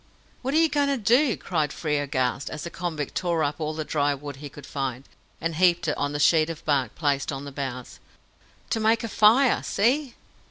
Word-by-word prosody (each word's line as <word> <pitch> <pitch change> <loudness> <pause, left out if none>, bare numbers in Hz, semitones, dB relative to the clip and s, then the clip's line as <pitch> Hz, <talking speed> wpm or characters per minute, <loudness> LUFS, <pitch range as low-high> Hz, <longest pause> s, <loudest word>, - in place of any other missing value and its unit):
"What 265 +3 -2
are - - +5
you 325 0 +5
going 290 -2 +1
to 280 -1 +1
do?" 240 +4 +3
cried 155 -5 -1
Frere, 150 -2 -1
aghast, 130 -1 -1
as 155 - -6
the 170 - -6
convict 160 -6 -4
tore 170 -3 0
up 145 +1 -2
all 155 0 -2
the 155 -1 -3
dry 145 -1 +1
wood 140 0 -8
he 145 +1 -8
could 140 0 -12
find, 135 -2 -4 0.3
and 165 0 -2
heaped 175 -1 +3
it 150 - +1
on 145 - -1
the 145 - -3
sheet 155 +2 +4
of 165 -2 -7
bark 140 -4 0
placed 145 -3 0
on 135 0 -5
the 140 - -7
bows. 130 -3 -6 0.7
"To 225 - +1
make 220 +1 +2
a - - -2
fire! 225 +5 +4
See!" 250 +5 0
155 Hz, 215 wpm, -25 LUFS, 145-215 Hz, 0.7 s, are